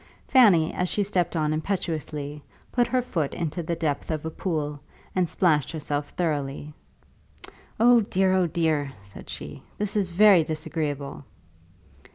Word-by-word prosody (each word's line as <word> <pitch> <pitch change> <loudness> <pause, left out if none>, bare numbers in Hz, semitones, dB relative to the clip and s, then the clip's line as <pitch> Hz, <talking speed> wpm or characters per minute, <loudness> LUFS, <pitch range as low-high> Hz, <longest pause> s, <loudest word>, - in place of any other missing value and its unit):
Fanny, 200 - +5
as 180 0 -1
she 205 - +1
stepped 185 -4 -1
on 155 -1 +1
impetuously, 155 -4 -3 0.3
put 240 -1 +2
her 255 -1 +1
foot 160 - -2
into 165 0 -3
the 170 +1 -2
depth 155 -4 -2
of 155 -1 -2
a 160 - -3
pool, 150 -5 -3 0.4
and 180 -3 +1
splashed 155 -7 +2
herself 145 -2 -3
thoroughly. 150 -3 -3 1.1
"Oh 240 +1 +7
dear, 190 -2 +1
oh 185 -2 +3
dear," 155 -4 0
said 100 0 -13
she; - - -7 0.2
"this 210 0 -2
is 200 -3 +1
very 190 -1 +6
disagreeable." 150 -3 -4
160 Hz, 145 wpm, -25 LUFS, 150-190 Hz, 1.1 s, Oh